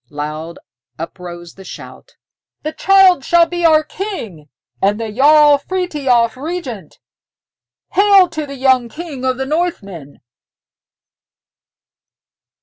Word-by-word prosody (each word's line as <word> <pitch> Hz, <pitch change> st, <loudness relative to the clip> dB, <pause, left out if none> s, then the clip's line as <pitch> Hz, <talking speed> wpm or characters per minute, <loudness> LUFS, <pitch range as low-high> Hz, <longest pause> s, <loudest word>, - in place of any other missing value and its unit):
Loud 155 Hz, +3 st, -6 dB, 0.4 s
uprose 175 Hz, 0 st, -9 dB
the 195 Hz, -, -14 dB
shout, -, -, -12 dB, 0.5 s
"The 310 Hz, -, -4 dB
child 380 Hz, -5 st, +4 dB
shall 340 Hz, +3 st, +4 dB
be 345 Hz, +1 st, -5 dB
our 310 Hz, -2 st, +4 dB
king, 230 Hz, -, -7 dB, 0.3 s
and 205 Hz, +2 st, +1 dB
the 225 Hz, -1 st, -4 dB
Jarl 295 Hz, +4 st, +5 dB
Frithiof 280 Hz, -10 st, 0 dB
regent. 265 Hz, -, -7 dB, 0.9 s
Hail 395 Hz, -2 st, +5 dB
to 310 Hz, -3 st, -5 dB
the 280 Hz, -, -8 dB
young 260 Hz, -2 st, +2 dB
King 300 Hz, -1 st, -8 dB
of 260 Hz, -1 st, 0 dB
the 265 Hz, -, -3 dB
Northmen!" 205 Hz, -, -4 dB
270 Hz, 110 wpm, -16 LUFS, -, 0.9 s, Jarl